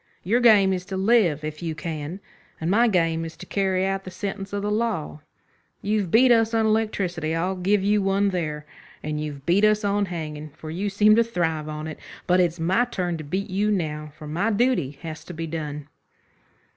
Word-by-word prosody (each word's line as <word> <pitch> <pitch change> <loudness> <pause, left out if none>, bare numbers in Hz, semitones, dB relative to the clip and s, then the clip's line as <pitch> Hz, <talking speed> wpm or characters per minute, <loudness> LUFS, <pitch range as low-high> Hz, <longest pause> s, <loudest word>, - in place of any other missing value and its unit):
Your 225 +7 +2
game 210 -5 +6
is 180 -1 -3
to 190 -1 -4
live 190 -7 +3
if 155 +1 -5
you 165 -2 -3
can, 155 +3 -5 0.4
and 165 +2 -1
my 235 +4 +4
game 165 -5 +1
is 165 0 -7
to - - -9
carry 190 -1 0
out 195 0 -1
the 185 - -7
sentence 195 +1 -5
of 200 0 -3
the 210 - -1
law. 210 -9 -2 0.6
You've 205 -3 0
beat 245 +6 +5
us 225 -1 +3
on 225 -1 +3
electricity. 190 -7 0
I'll 180 +3 -1
give 190 +2 +1
you 205 +1 +3
one 195 +1 +2
there. 155 -5 -3 0.4
And 150 0 -3
you've 145 -2 -6
beat 180 +4 +3
us 215 0 +4
on 200 0 +1
hanging, 155 -3 -5
for 155 - -7
you 195 +5 -2
seem 210 +2 +5
to 230 - +6
thrive 160 -8 -2
on 155 0 -5
it. 155 - -7 0.3
But 180 +1 +3
it's 175 -1 +1
my 190 +9 +2
turn 180 -7 -2
to 155 - -7
beat 190 +7 -3
you 205 +3 +1
now, 155 -6 -2
for 155 - -10
my 170 +9 0
duty 215 - +1
has 160 -1 -6
to 175 - -8
be 165 +1 -4
done." 150 -2 -5
185 Hz, 210 wpm, -24 LUFS, 160-205 Hz, 0.6 s, game